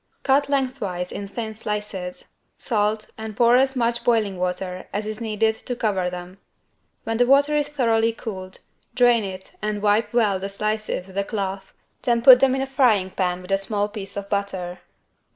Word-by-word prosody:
Cut 280 +1 +3
lengthwise 250 -10 -2
in 200 - -5
thin 220 +2 -5
slices, 210 -4 -5 0.3
salt 215 -2 -1
and 220 -1 -6
pour 240 0 +5
as 265 +1 +3
much 235 -1 0
boiling 215 -6 +1
water 180 0 -3
as 210 +1 -3
is 215 +1 -5
needed 220 0 +1
to 245 - -1
cover 195 -6 0
them. 180 +1 -8 0.6
When 225 0 -2
the 245 +1 +3
water 285 +3 +4
is 295 -1 +1
thoroughly 230 -6 +2
cooled, 190 -5 -8 0.3
drain 245 -2 +4
it 190 -1 -7
and 210 0 -2
wipe 210 +2 +2
well 215 -5 +2
the 195 +1 -4
slices 215 -2 -2
with 190 +1 -5
a - - +1
cloth, 195 -2 -4 0.3
then 235 -1 +1
put 250 -1 +10
them 265 0 +4
in 265 - -1
a - - -1
frying 245 -8 +2
pan 180 -1 -1
with 180 - -9
a 195 - +3
small 205 +1 -1
piece 205 -2 -8
of 200 0 -4
butter. 195 -3 -3
215 Hz, 185 wpm, -23 LUFS, 195-235 Hz, 0.6 s, put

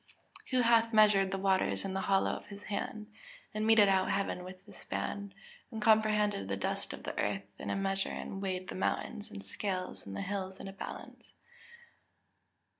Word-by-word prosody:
[Verse: - - -20
"Who 255 -2 +3
hath 230 -1 +4
measured 210 -3 +6
the 195 - -1
waters 190 0 +1
in 195 - -2
the 190 - -1
hollow 195 0 +3
of - - -6
his 200 0 -10
hand, 215 +1 -3 0.5
and 215 +1 0
meted 220 -2 +7
out 190 -1 +3
heaven 195 -2 0
with 185 +1 -10
the - - -14
span, 200 -1 -4 0.4
and 225 - -5
comprehended 210 - +3
the 100 0 -1
dust 100 - -2
of - - -8
the - - -4
earth 100 0 -1
in - - -5
a - - 0
measure 195 0 0
and 195 - -5
weighed 185 -1 -2
the - - -4
mountains 210 +3 -2
in 95 - -8
scales, 185 - -4
and 100 - -6
the - - -2
hills 190 -1 -4
in - - -7
a 195 - -7
balance?" 195 - -9
195 Hz, 190 wpm, -32 LUFS, 185-210 Hz, 0.5 s, meted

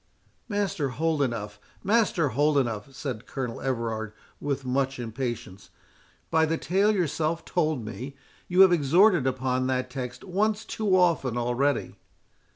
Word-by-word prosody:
"Master 200 -8 -1
Holdenough, 125 -10 -1 0.2
Master 200 -7 +2
Holdenough," 135 -3 +1
said 125 -4 -6
Colonel 125 -4 -4
Everard, 115 -4 -2 0.3
with 140 -2 -3
much 135 +1 0
impatience, 115 -5 -5 0.6
"by 160 - +4
the 165 +1 0
tale 195 +6 +2
yourself 165 -3 -1
told 155 -9 0
me, 130 +5 -7 0.3
you 180 +1 +4
have 190 -1 +8
exhorted 170 +1 +4
upon 130 0 0
that 130 -1 -1
text 125 -2 -6
once 210 +3 0
too 205 -4 +1
often 160 -9 +2
already." 125 +4 0
140 Hz, 125 wpm, -26 LUFS, 125-170 Hz, 0.6 s, have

